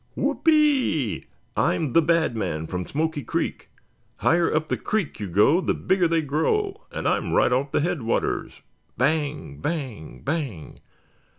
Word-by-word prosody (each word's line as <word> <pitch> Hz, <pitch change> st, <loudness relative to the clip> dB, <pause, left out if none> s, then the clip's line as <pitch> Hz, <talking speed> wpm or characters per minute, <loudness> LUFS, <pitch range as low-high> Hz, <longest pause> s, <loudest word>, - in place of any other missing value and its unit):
"Whoopee! 285 Hz, -, +2 dB, 0.3 s
I'm 155 Hz, -6 st, +1 dB
the 165 Hz, -, +6 dB
Bad 165 Hz, -5 st, +2 dB
Man 85 Hz, -7 st, -2 dB
from 90 Hz, +1 st, -4 dB
Smoky 155 Hz, 0 st, -1 dB
Creek! -, -, -3 dB, 0.5 s
Higher 170 Hz, 0 st, +2 dB
up 155 Hz, 0 st, 0 dB
the -, -, +1 dB
creek 215 Hz, -, -2 dB
you 105 Hz, -, -3 dB
go, 105 Hz, -, +4 dB
the -, -, 0 dB
bigger 185 Hz, -2 st, +2 dB
they 165 Hz, -1 st, +1 dB
grow, 160 Hz, -, -1 dB
and -, -, -3 dB
I'm -, -, 0 dB
right 125 Hz, -, +4 dB
off 135 Hz, +2 st, 0 dB
the -, -, +2 dB
headwaters!" 155 Hz, -8 st, -1 dB, 0.4 s
"Bang, 145 Hz, -, -1 dB
bang, 130 Hz, -, -4 dB
bang!" 135 Hz, -, -3 dB
150 Hz, 140 wpm, -24 LUFS, 120-170 Hz, 0.5 s, the